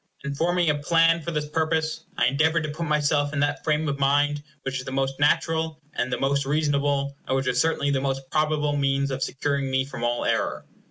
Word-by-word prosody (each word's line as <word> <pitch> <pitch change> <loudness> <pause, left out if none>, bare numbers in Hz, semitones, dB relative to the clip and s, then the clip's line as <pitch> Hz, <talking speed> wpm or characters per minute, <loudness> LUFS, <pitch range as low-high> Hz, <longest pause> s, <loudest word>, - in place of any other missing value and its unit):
In 140 0 -3
forming 175 +4 +1
a 150 - +4
plan 165 +2 +3
for 170 - -5
this 150 -2 -2
purpose, 160 0 -1
I - - +3
endeavored 160 +6 +2
to 155 - -3
put 165 +2 -4
myself 150 -1 +1
in 150 - -1
that 145 0 0
frame 155 0 +1
of 140 -1 -2
mind 145 +1 +2 0.2
which 135 -1 -2
was 130 - -7
the - - -5
most 135 0 -1
natural 160 +1 +1
and 125 +1 -2
the - - 0
most 140 +1 +1
reasonable, 140 -1 0
and 130 - +1
which 135 - -1
was 125 -1 +2
certainly 145 -3 +1
the 135 -1 +1
most 135 -1 -2
probable 150 -1 +1
means 140 -1 +1
of 135 0 -3
securing 140 0 -1
me 130 0 +1
from 135 -3 -7
all 120 0 0
error. - - -1
145 Hz, 220 wpm, -25 LUFS, 135-155 Hz, 0.2 s, a